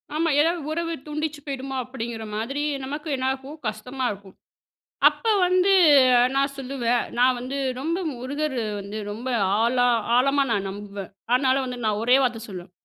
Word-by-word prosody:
ஆமா 330 +1 +1
ஏதாவது 330 +2 +2
உறவு 335 +1 -2
தூண்டிச்சு 305 0 -3
போயிடுமா 270 -1 -5
அப்படிங்கிற 235 -3 -6
மாதிரி 270 +7 -2 0.2
நமக்கு 295 +4 -5
என்ன 260 0 -3
ஆகும்? 270 +4 -9
கஷ்டமா 250 +5 -4
இருக்கும். 195 -1 -11 0.7
அப்ப - - -11 0.2
வந்து 370 +2 +3 0.6
நான் 275 +1 +1
சொல்லுவேன், 250 -3 -1
நான் 250 0 +4
வந்து 255 +3 -5 0.2
ரொம்ப 330 +6 -1
முருகர் 265 +2 -3 0.2
வந்து 200 +2 -6
ரொம்ப 235 +5 -6 0.3
ஆழ 235 +2 +1 0.4
ஆழமா 275 +3 +3
நான் 200 -3 0
நம்புவேன். 200 -1 -8 0.2
ஆனால 260 0 +3
வந்து 250 -1 -5
நான் 210 -1 0
ஒரே 245 +3 +5
வார்த்த 245 -3 0
சொல்லுவேன், 180 -2 -8
260 Hz, 150 wpm, -24 LUFS, 230-290 Hz, 0.7 s, ஒரே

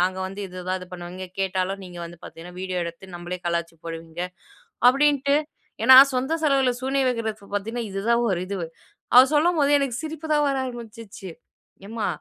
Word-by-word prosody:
நாங்க 185 +1 +1
வந்து 195 +2 -7
இது 180 - -12
எதாவது 185 0 -3
பண்ணுவீங்க. 180 +1 -7
கேட்டாலும் 190 +1 -1
நீங்க 175 -1 -10
வந்து 170 0 -10
பாத்தீங்கனா, 175 +2 -11
வீடியோ 185 -1 -2
எடுத்து 170 +2 -9
நம்மளையே 175 +1 -6
கலாய்ச்சு 170 -1 -2
போடுவீங்க", 165 0 -7 0.7
அப்படின்ட்டு 280 +1 +3 0.5
ஏன்னா, 260 - +9 0.2
சொந்த 260 +5 0
செலவுல 275 -4 +3
சூனிய 270 +1 +1
வைக்கிறது 220 -4 -3
பாத்தீங்கனா, 225 +4 -3
இது 195 - -3
தான், 235 0 +4
ஒரு 185 -3 0
இதுவு. 195 -4 -3 0.5
அவரு 255 +2 +9
சொல்லும்போது, 305 -1 +3
எனக்கு 275 -4 -1
சிரிப்பு 315 0 -6
தான் 295 - +3
வர 275 - 0
ஆரம்பிச்சுச்சு. 230 -5 -9 0.6
எம்மா 220 -1 -3
200 Hz, 160 wpm, -24 LUFS, 180-260 Hz, 0.7 s, ஏன்னா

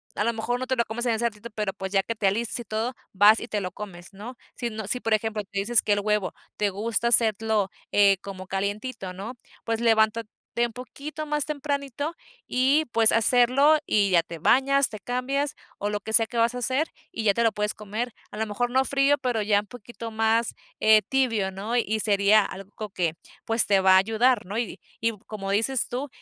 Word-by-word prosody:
a 205 - 0
lo 235 - +1
mejor 235 +2 -2
no 255 - -4
te 260 - 0
lo 235 -1 +1
comes 240 +3 -3
en 235 - +2
ese 225 +2 -1
ratito, 230 0 -4
pero, 210 -3 -2
pues, 190 0 -6
ya 195 -1 +2
que 230 - -3
te 210 -2 +1
alistes 230 +5 -1
y - - -5
todo, 220 +4 -2 0.2
vas 205 +3 +6
y - - -7
te 215 - -2
lo 180 - -4
comes, 185 -2 -10
¿no? 215 +6 -9 0.2
Si 240 - -3
no, 220 -1 -6
si, 250 - -1
por 225 - 0
ejemplo, 220 0 -2
tú 195 - -29
dices 205 +4 +2
que 205 - +1
el 205 - 0
huevo 210 -2 0 0.2
te 210 -1 0
gusta 220 +4 -1
hacerlo 220 -3 +3 0.5
como 190 -2 -8
calientito, 200 +1 -3
¿no? 200 +6 -7 0.3
Pues, 225 0 -1
levántate 220 -1 +2 0.3
un 235 0 +1
poquito 280 +5 -7
más 300 -1 0
tempranito 285 0 -3 0.3
y, 270 +5 +2
pues, 225 -1 +5
hacerlo 255 +6 +4
y 200 -2 +2
ya 170 - +5
te 165 0 -9
bañas, 275 - +3
te 215 - -8
cambias 275 +6 -2 0.2
o 205 - -1
lo 210 0 -2
que 220 +2 -7
sea 225 -1 +5
que 235 - -6
vas 230 +1 +3
a 250 - -4
hacer, 260 +6 0 0.2
y 225 - -4
ya 205 -2 +4
te 235 - 0
lo 225 -1 +3
puedes 210 0 -1
comer. 215 +3 -5 0.2
A - - -10
lo 220 - -1
mejor, 230 +3 -2
no 260 +2 +2
frío, 280 +1 +2
pero 245 -4 -1
ya 205 -1 +2
un - - -15
poquito 230 +1 -9
más, 225 +1 +1 0.3
eh, 215 0 +6
tibio, 230 -8 +1
¿no? 205 +5 -4
Y 220 -2 0
sería 205 0 +4
algo 195 +2 -8
que, 175 -4 -2 0.3
pues, 225 +1 +2
te 200 -1 +3
va 190 0 +5
a - - +8
ayudar, 225 +4 +2
¿no? 205 +5 -3
Y 235 - -4 0.2
y 230 +1 +2
como 195 -2 -6
dices 230 +5 +1
tú, 260 +4 -3
225 Hz, 220 wpm, -25 LUFS, 205-245 Hz, 0.5 s, a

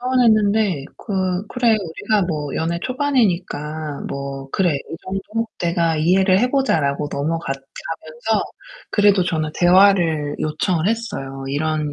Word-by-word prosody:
서운했는데 215 - +2
'그 190 -2 -2
그래. 245 -2 +2
우리가 200 +3 -1
뭐 150 -5 -3
연애 170 +1 -1
초반이니까 180 - -1
뭐 140 0 -5
그래 180 -2 +1
이 140 +3 -6
정도 195 +4 -3
내가 170 -2 +1
이해를 185 +4 +4
해 250 +4 +2
보자.' 270 - +2
라고 140 +1 -1
넘어갔 155 +1 -1 0.3
가면서 165 +7 -2 0.5
그래도 205 -2 +4
저는 160 -3 -1
대화를 175 -5 +4
요청을 165 +3 0
했어요. 200 -13 -4
"이런 150 +1 -1
175 Hz, 285 characters per minute, -20 LUFS, 155-205 Hz, 0.5 s, 이해를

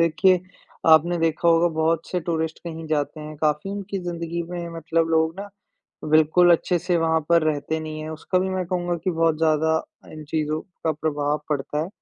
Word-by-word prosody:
देखिए, 170 +3 +4 0.5
आपने 160 +2 +5
देखा 165 +1 +1
होगा 165 +1 +5
बहुत 165 +1 +1
से 180 - -1
टूरिस्ट 160 -1 -2
कहीं 165 -1 -6
जाते 155 0 -2
हैं, 150 0 -8
काफ़ी 150 +4 0
उनकी 200 0 -4
ज़िंदगी 170 -1 -3
में 175 -1 -4
मतलब 165 0 0
लोग 160 0 +2
ना, 205 - -7 0.6
बिल्कुल 160 +3 +5
अच्छे 175 +1 +1
से 175 +1 0
वहाँ 160 0 +2
पर 170 -1 +4
रहते 155 +1 -1
नहीं 155 0 -6
हैं, 155 +1 -6
उसका 160 +4 -1
भी 190 +1 0
मैं 185 -1 -1
कहूँगा 175 -1 -1
कि 185 - +2
बहुत 165 -2 +1
ज़्यादा 160 0 +2 0.3
इन 155 -1 -9
चीज़ों 155 +1 -2 0.2
का 160 - +2
प्रभाव 150 -1 -1
पड़ता 150 +1 -1
है। 165 - -5
160 Hz, 190 wpm, -23 LUFS, 155-170 Hz, 0.6 s, आपने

